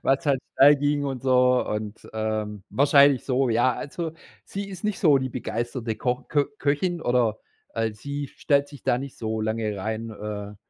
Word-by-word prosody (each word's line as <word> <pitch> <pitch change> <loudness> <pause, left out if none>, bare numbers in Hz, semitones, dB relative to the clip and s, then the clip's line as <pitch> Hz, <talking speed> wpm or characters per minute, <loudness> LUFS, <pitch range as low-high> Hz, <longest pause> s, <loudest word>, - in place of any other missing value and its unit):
was 135 +5 +2
halt 135 -2 +2 0.2
schnell 145 +2 +8
ging 145 0 0
und 135 -3 -4
so 125 -1 +3
und 105 0 -5
ähm, 110 -2 -3
wahrscheinlich 140 -1 +5
so, 130 -1 +1
ja. 120 +3 +3
Also 160 +2 -5 0.3
sie 200 0 -5
ist 190 -2 -9
nicht 210 -2 -1
so 150 -6 +5
die 130 0 -2
begeisterte 120 -1 -3
Ko 125 0 -1
Kö 145 -2 +2
Köchin 165 +4 0
oder 120 -3 +1 0.3
al 115 -1 -1
sie 140 +4 -5
stellt 140 -1 +1
sich 145 -2 -13
da 120 - +2
nicht 135 0 -8
so 110 -1 -2
lange 110 -1 -1
rein, 110 +3 -4
äh, 105 -1 -6
125 Hz, 180 wpm, -25 LUFS, 110-145 Hz, 0.3 s, schnell